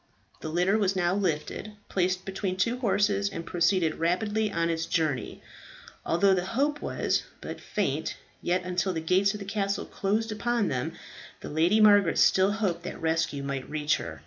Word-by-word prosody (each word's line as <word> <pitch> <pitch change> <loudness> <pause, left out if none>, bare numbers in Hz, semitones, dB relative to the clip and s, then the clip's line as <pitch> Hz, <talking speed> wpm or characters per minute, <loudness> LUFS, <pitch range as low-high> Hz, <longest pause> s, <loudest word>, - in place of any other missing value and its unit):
The 155 - -5
litter 180 +6 +2
was 195 -2 +1
now 175 -1 +1
lifted, 190 +2 -2
placed 185 0 0
between 190 -1 -3
two 235 +5 0
horses, 205 -3 +1
and 165 -4 -6
proceeded 170 -2 +1
rapidly 210 +6 0
on 170 -2 0
its 165 0 -2
journey. 155 -7 -1 0.6
Although 195 +3 +3
the 180 -1 +1
hope 295 +2 +1
was - - 0 0.2
but - - -7
faint, - - -2 0.3
yet 180 +1 0
until 180 +1 -1
the 165 - -2
gates 190 +5 +2
of - - -6
the 200 - -7
castle 200 0 -1
closed 215 +3 -1
upon 235 0 0
them 125 -2 -2 0.5
the - - -7
Lady 170 +8 +3
Margaret 205 -4 +5
still 190 +2 +4
hoped 195 -6 -1
that 175 - -7
rescue 160 -3 0
might 140 -1 -4
reach 150 0 +1
her. 80 -1 -7
185 Hz, 170 wpm, -27 LUFS, 165-205 Hz, 0.6 s, Margaret